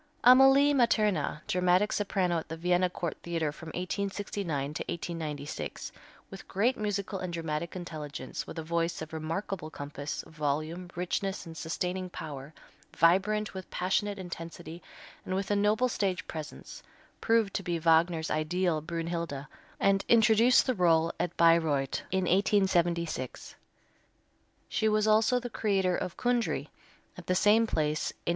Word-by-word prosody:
Amalie 270 +3 +7
Materna, 210 - +1
dramatic 180 +3 +2
soprano 185 -4 0
at 160 - -10
the 160 - -5
Vienna 180 +2 +2
Court 175 -2 -4
Theatre 165 -3 -2
from 160 +2 -11
1869 180 -4 -3
to - - -3
1896, 155 -4 -5 0.4
with 195 - -10
great 230 +7 +1
musical 205 -2 -3
and 185 -1 -4
dramatic 165 0 -3
intelligence, 150 -7 -6
with - - -8
a 160 - -3
voice 170 0 -1
of 160 - -11
remarkable 160 +1 -4
compass, 145 -1 -6
volume, 155 +4 -3
richness 185 +2 -2
and 165 -1 -9
sustaining 180 +4 -3
power, 145 -4 -7 0.5
vibrant 200 +5 +3
with 190 -1 -8
passionate 200 +3 -1
intensity, 170 -2 -8 0.4
and 185 - -3
with 195 +1 -2
a - - +3
noble 210 +4 +3
stage 190 -7 -1
presence, 155 -2 -8 0.4
proved 225 -3 +2
to - - -1
be 175 -2 -2
Wagner's 165 0 +2
ideal 160 +1 0
Brünnhilde 165 -3 -4 0.3
and 195 0 +3
introduced 230 +1 +5
the 255 - +1
rôle 165 -4 +3
at 175 -1 -2
Bayreuth 160 -5 +3
in 190 0 0
1876. 175 - +1 1.1
She 220 - +1
was 215 0 +2
also 220 +3 +4
the 245 - -5
creator 195 -5 +1
of 175 - -4
Kundry 245 -2 0 0.5
at - - -12
the 185 - +2
same 215 +4 +4
place 155 -4 0
in - - -8
1882. - - -36
175 Hz, 140 wpm, -29 LUFS, 160-200 Hz, 1.1 s, Amalie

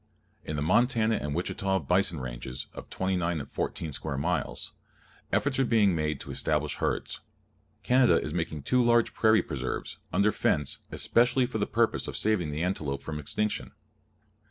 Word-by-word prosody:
In 75 - -4
the 70 - -1
Montana 115 - +3
and 75 0 -3
Wichita 95 +2 0
Bison 90 -3 +1
Ranges, 65 0 -5
of - - -10
29 90 -4 -1
and - - -8
14 80 - -3
square 75 0 -2
miles, 85 +1 -2 0.6
efforts 135 -1 +1
are - - +5
being 110 -6 +3
made 75 -3 -1
to - - -7
establish - - -1
herds. - - -2 0.6
Canada 125 0 +5
is 75 - -4
making 80 -4 -3
two 125 - +3
large 120 -1 +3
prairie 110 -1 +4
preserves, - - -4
under 105 +1 +3
fence, 75 -7 0
especially 125 +2 +3
for 120 -3 -4
the 100 - 0
purpose 115 +1 +1
of - - -4
saving 105 -7 +1
the 75 +3 -2
antelope 75 -7 -2
from 75 -1 -4
extinction. 105 +9 -2
90 Hz, 160 wpm, -28 LUFS, 75-110 Hz, 0.6 s, are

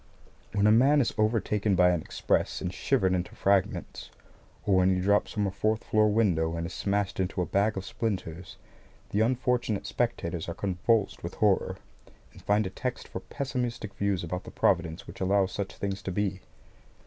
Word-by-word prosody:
When 100 0 +2
a 105 - +6
man 135 +6 +5
is 125 - +1
overtaken 105 -2 +1
by 90 0 +5
an 85 -2 0
express - - -1
and 90 0 -4
shivered 95 -8 +1
into 90 -1 -2
fragments, 100 -1 0 0.6
or 95 -2 +3
when 95 0 +4
he - - 0
drops 100 +2 +2
from 105 -1 0
a 95 - -1
fourth 110 +3 0
floor 110 0 +3
window 90 -7 +2
and 85 - -2
is 85 - -6
smashed 100 -1 -1
into 95 0 -1
a 90 - +1
bag 100 +3 +1
of 95 - -4
splinters, 90 -7 -4 0.5
the 105 - +1
unfortunate 120 -3 0
spectators 90 -6 -2
are 85 - -4
convulsed 100 +3 0
with 85 - -6
horror, 105 -3 +2 0.6
and - - -14
find 105 +1 +2
a 95 - -4
text 125 +3 -4
for - - -6
pessimistic 125 -7 -4
views 100 -3 -1
about 90 +2 -4
the - - -9
Providence 85 0 0
which - - -11
allows 95 0 +2
such 100 0 -4
things 100 -1 -3
to 95 - -4
be. 100 0 -1
100 Hz, 185 wpm, -28 LUFS, 90-110 Hz, 0.6 s, a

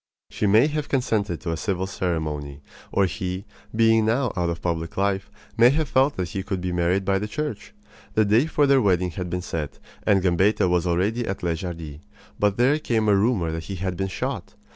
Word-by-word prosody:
She 105 - 0
may 110 +6 +6
have 150 -1 -2
consented 105 - 0
to 85 - -3
a 80 - -2
civil 95 +1 -1
ceremony; 75 -7 -3 0.3
or 100 - +3
he, 90 +3 -4 0.3
being 115 0 +4
now 120 +2 +1
out 90 -2 0
of 85 0 -3
public 85 -2 -3
life, 100 +1 0 0.3
may 120 +1 +8
have 150 +3 +1
felt 135 +2 +2
that 90 -2 -2
he 95 - -3
could 95 -1 -3
be 90 0 -3
married 90 +2 +1
by 95 0 +2
the 105 - -3
Church. 115 -4 -5 0.4
The 110 - +4
day 110 +9 +3
for 150 -2 +2
their 135 -1 +4
wedding 90 -4 +2
had 90 +2 -5
been 90 +1 -3
set, 80 -5 -4 0.2
and 100 -3 +2
Gambetta 95 +2 +3
was 90 0 +1
already 100 +8 0
at 95 - -4
Les 85 -2 0
Jardies. 80 -5 -6 0.4
But 105 -1 +2
there 135 +5 +3
came 110 -7 0
a 105 - +5
rumor 100 -5 +1
that 80 0 -5
he 100 - -5
had 95 0 -3
been 95 +2 -2
shot. 95 - -4
95 Hz, 210 wpm, -24 LUFS, 85-110 Hz, 0.4 s, may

